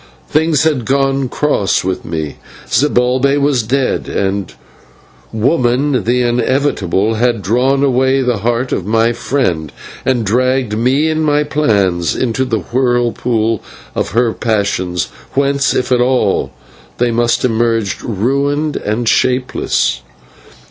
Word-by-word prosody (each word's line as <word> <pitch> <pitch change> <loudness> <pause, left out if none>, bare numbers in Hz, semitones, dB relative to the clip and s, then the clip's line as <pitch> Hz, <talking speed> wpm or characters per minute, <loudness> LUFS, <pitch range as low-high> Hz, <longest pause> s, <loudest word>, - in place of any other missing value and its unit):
Things 155 -1 +2
had 150 -6 +1
gone 135 0 +1
cross 140 -10 0
with 95 0 -3
me; 80 -3 -4 0.3
Zibalbay 130 0 +2
was 140 -3 +2
dead, 130 +4 -1
and 95 -4 -2 0.8
Woman, 125 +3 +1
the 125 +2 +2
inevitable, 120 -5 0
had 120 -3 0
drawn 130 +7 +2
away 130 0 +2
the 125 -3 0
heart 120 +4 -1
of - - -1
my 115 +4 +1
friend 90 - -1 0.3
and 125 -4 0
dragged 125 +1 +1
me 130 +7 +2
and 160 0 0
my 150 -1 +2
plans 100 - +1
into 130 +1 -1
the 115 -5 -1
whirlpool 120 -3 0 0.3
of - - -3
her 115 -1 +2
passion, 100 -5 -1 0.4
whence, 140 0 +1
if 125 +1 -1
at 125 -1 +3
all, 125 +1 +1 0.5
they 120 0 +1
must 120 +1 +1
emerge 115 -3 0
ruined 140 +7 -1
and 110 +3 -2
shapeless. 125 - +1
125 Hz, 125 wpm, -15 LUFS, 110-135 Hz, 0.8 s, at